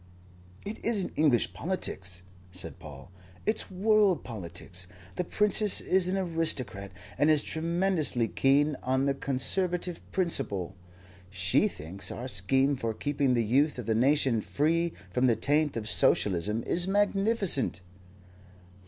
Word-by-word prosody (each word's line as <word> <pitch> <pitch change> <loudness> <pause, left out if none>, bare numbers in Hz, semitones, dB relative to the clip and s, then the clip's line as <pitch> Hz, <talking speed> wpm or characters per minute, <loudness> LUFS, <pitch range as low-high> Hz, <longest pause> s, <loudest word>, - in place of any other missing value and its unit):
"It 210 +2 -6
isn't 215 -5 0
English 145 -6 +2
politics," 95 - -4 0.3
said 90 0 -5
Paul. 75 -1 -12 0.3
"It's 215 +1 0
world 205 -1 +2
politics. 90 -4 -6 0.3
The 180 - -1
Princess 210 +2 +3
is 185 -1 +2
an 190 +1 0
aristocrat 160 - -2 0.3
and 145 +2 +4
is 155 -2 +4
tremendously 165 -6 0
keen 145 +4 +2
on 130 +1 0
the 140 - +2
Conservative 175 +7 -1
principle. 135 - -1 0.6
She 95 -1 +2
thinks 85 +6 -6
our 125 - -6
scheme 130 +7 +1
for 115 -3 -3
keeping 140 -2 0
the 115 -1 +1
youth 140 +7 +2
of 125 - -5
the 110 - +1
nation 130 -1 +2
free 165 +7 0 0.2
from 125 +7 +2
the 115 - +3
taint 145 +4 +1
of 110 -2 -4
Socialism 105 +2 +2
is 175 +1 0
magnificent." 200 - +2
140 Hz, 130 wpm, -28 LUFS, 110-175 Hz, 0.6 s, and